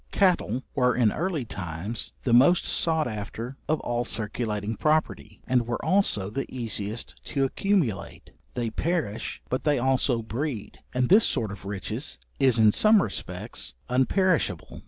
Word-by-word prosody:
Cattle 175 - +2
were 125 -2 +2
in 115 -4 +3
early 165 -6 -2
times 95 +3 -5
the 120 - +1
most 140 +9 +6
sought 160 -3 +2
after 115 +3 -5
of 155 - +2
all 120 0 -1
circulating 110 -1 -3
property; 150 -6 0
and 125 -2 +1
were 120 - -3
also 105 - +1
the 135 +4 -3
easiest 115 -3 -5
to 140 -2 0
accumulate; 135 - -1 0.2
they 120 -2 -1
perish, 155 - -2
but 130 - -2
they 150 -2 +2
also 125 -2 +1
breed, 115 0 -4
and 125 0 0
this 215 +4 +7
sort 110 -6 -1
of 100 -2 -9
riches 105 +7 -4 0.2
is 130 -4 +4
in 110 -1 +6
some 215 - +5
respects 100 - -5 0.2
unperishable. 130 - +1
125 Hz, 145 wpm, -26 LUFS, 110-150 Hz, 0.2 s, this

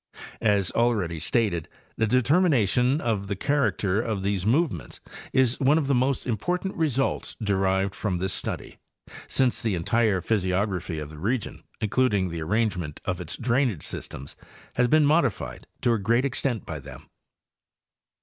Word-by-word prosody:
As 100 -4 +2
already 105 -9 +1
stated, 85 -2 0 0.3
the 110 - +1
determination 130 - +3
of 110 -7 -1
the 100 - -2
character 110 -5 +1
of 110 -5 -2
these 100 -1 0
movements 120 - 0 0.3
is 130 -2 +2
one 140 +3 +4
of 160 - +1
the 140 - +1
most 130 +1 +1
important 180 - -1
results 140 -5 0
derived 95 -2 +1
from 95 -5 -2
this 95 +2 -1
study, - - -5 0.5
since 130 -2 +1
the 110 -4 0
en 85 - -3
tire 110 -1 +2
physiography 95 -3 -1
of 75 -1 -6
the 75 - -10
region, 110 +6 -2 0.2
including 105 -4 +2
the 85 -1 -5
arrangement 90 -4 -1
of 90 -2 -2
its 85 - -5
drainage 120 - 0
systems, 70 - -7 0.4
has 125 0 +3
been 155 +3 +4
modified 145 - 0
to 120 - +3
a 115 - 0
great 115 +6 +2
extent 125 -4 -1
by 80 -2 -5
them. 65 -2 -11
110 Hz, 150 wpm, -26 LUFS, 95-130 Hz, 0.5 s, one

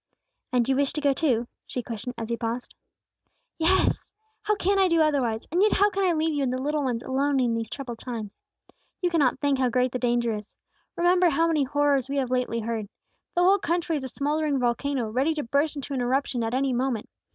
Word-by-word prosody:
"And 245 -2 +2
you 265 - +2
wish 280 0 +1
to 300 - -3
go 285 -1 +3
too?" 250 -6 +1 0.2
she 250 - -4
questioned, 235 +2 -6
as 225 -1 -5
he 235 - 0
paused. 230 +2 -4 0.9
"Yes! 350 +4 +2 0.3
How 425 - +1
can 395 0 +1
I 380 - +5
do 335 -2 +2
otherwise? 270 -8 +1
And 350 +3 +2
yet 425 - +4
how 410 +1 +4
can 395 0 -1
I 360 -2 +3
leave 320 0 0
you 290 - -1
and 260 -2 0
the 255 - -2
little 295 +2 -1
ones 245 -2 -1
alone 275 +1 +1
in 245 -2 +2
these 225 -1 -3
troubled 245 -5 -6
times? 225 -5 -6 0.6
You 355 -2 0
cannot 290 -8 +2
think 285 -2 +1
how 255 -1 +2
great 250 +1 +1
the 250 - -3
danger 240 -2 +1
is. 210 -1 -8 0.4
Remember 355 +1 +4
how 325 +2 +2
many 315 -4 +2
horrors 280 -1 +1
we 280 - -2
have 260 -2 -1
lately 250 -2 0
heard. 220 -2 -3 0.5
The 350 - +3
whole 390 +3 +5
country 340 -2 -1
is 285 - -3
a - - -3
smouldering 295 +2 0
volcano, 250 0 0
ready 275 +7 +1
to 300 - -2
burst 285 +6 0
into 285 0 -5
an 260 - -1
eruption 250 -1 0
at 225 +2 -1
any 265 0 +1
moment. 245 -3 -1
270 Hz, 225 wpm, -26 LUFS, 240-310 Hz, 0.9 s, I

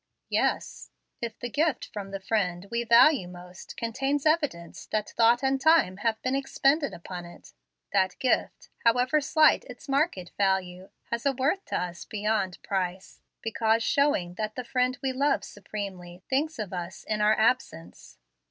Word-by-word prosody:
"Yes. - - -1 0.3
If 230 -1 -4
the 245 - -4
gift 310 +2 +1
from 200 -2 -6
the 195 0 -5
friend 190 -3 -1
we 235 0 0
value 235 - +5
most 180 0 -11
contains 270 +5 -1
evidence 290 - 0
that 215 -1 -2
thought 235 +3 +3
and 270 0 +1
time 315 - +4
have 220 +1 -1
been 255 - 0
expended 275 +2 +1
upon 175 +1 -8
it, 175 0 -14 0.4
that 190 -2 +2
gift, 255 - -1
however 250 +6 +3
slight 310 +2 +4
its - - -12
market 275 - 0
value, 190 -1 0 0.2
has 235 0 -2
a 275 - +2
worth 280 +10 0
to - - -2
us 175 -3 -5
beyond 210 -3 -1
price, 185 -1 -3 0.2
because 225 0 +1
showing 280 -13 +1
that 215 0 -3
the 255 - -4
friend 255 +1 0
we 265 - +1
love 280 +2 +1
supremely 190 -3 -7
thinks 300 +4 0
of 210 -4 -5
us 175 0 -6
in 215 -1 -2
our 215 +1 +4
absence." 165 - -1
220 Hz, 160 wpm, -27 LUFS, 185-270 Hz, 0.4 s, value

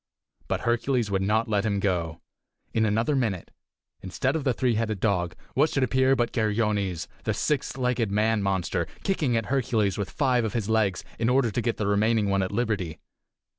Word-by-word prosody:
But - - -1
Hercules 120 -2 0
would 95 -1 +1
not 110 +4 +1
let 105 -2 +1
him 100 -2 0
go. 85 -5 -1 0.5
In 110 -1 +2
another 115 +8 +1
minute, 110 -9 -1 0.5
instead 95 - -1
of 160 - -1
the 135 - +2
three 125 0 +1
headed 110 -2 -1
dog, 90 -5 0 0.2
what 150 +4 +3
should 135 - 0
appear 130 +2 +3
but 120 -2 0
Geryones, 105 -6 0 0.2
the - - -1
six 145 -2 -1
legged 125 -4 0
man 105 +1 +2
monster, 95 -3 -1 0.2
kicking 150 -11 +1
at 115 - -1
Hercules 115 -6 0
with 100 - -2
five 130 -4 +1
of 110 - -2
his 115 -4 -1
legs 110 -4 +1 0.2
in 115 +1 +1
order 125 -3 +3
to 120 - -1
get 115 0 -1
the 105 - -1
remaining 105 +1 +2
one 100 0 +2
at 95 - -2
liberty! 100 -8 -1
110 Hz, 190 wpm, -26 LUFS, 100-125 Hz, 0.5 s, what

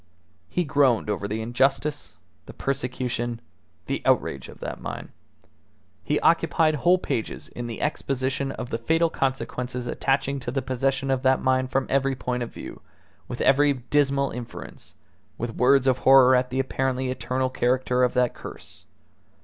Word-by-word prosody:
He 180 - 0
groaned 135 -8 +2
over 100 0 -2
the 110 +2 -3
injustice, 135 +5 0 0.3
the - - -9
persecution, 125 -3 -2 0.5
the - - -2
outrage 65 -2 +1
of - - -13
that - - -6
mine; - - -6 0.9
he - - 0
occupied 155 -1 +3
whole 175 +5 +3
pages 115 -10 -4
in 120 0 -6
the 115 - -6
exposition 135 -2 -1
of 125 - -7
the 115 - -1
fatal 165 +7 +2
consequences 125 -2 -2
attaching 140 +2 0
to 120 - -5
the 135 +2 -2
possession 135 +1 0
of 130 -1 +1
that 130 0 +3
mine 130 0 +1
from 135 +1 0
every 135 0 +1
point 125 -1 -3
of 120 - -4
view, - - -9 0.5
with - - -5
every 145 +1 +4
dismal 140 +2 +1
inference, 120 -2 -9 0.4
with 115 0 -4
words 135 +3 +4
of 130 -1 +2
horror 130 -1 +7
at 125 0 +1
the 130 - -2
apparently 130 -1 -1
eternal 130 0 -2
character 125 0 +1
of 125 - +1
that 125 -1 +2
curse. - - -11
130 Hz, 155 wpm, -25 LUFS, 125-135 Hz, 0.9 s, horror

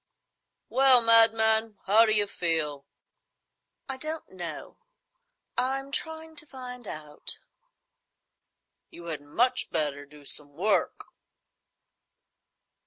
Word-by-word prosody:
"Well, 260 -2 +5
madman, 225 -1 +6
how 220 +4 +3
d'you 215 -1 +5
feel?" 160 -7 -4 1.0
"I 265 -1 -5
don't 310 +3 -5
know. 175 -4 -10 0.8
I'm 270 +2 -4
trying 320 +1 -5
to 300 +1 -2
find 250 -4 -12
out." 150 -1 -7 1.5
"You 170 - -14
had 150 - -8
much 230 - -1
better 145 -3 -5
do 145 0 -17
some 145 0 -10
work." 190 +8 -3
220 Hz, 95 wpm, -25 LUFS, 155-260 Hz, 1.5 s, madman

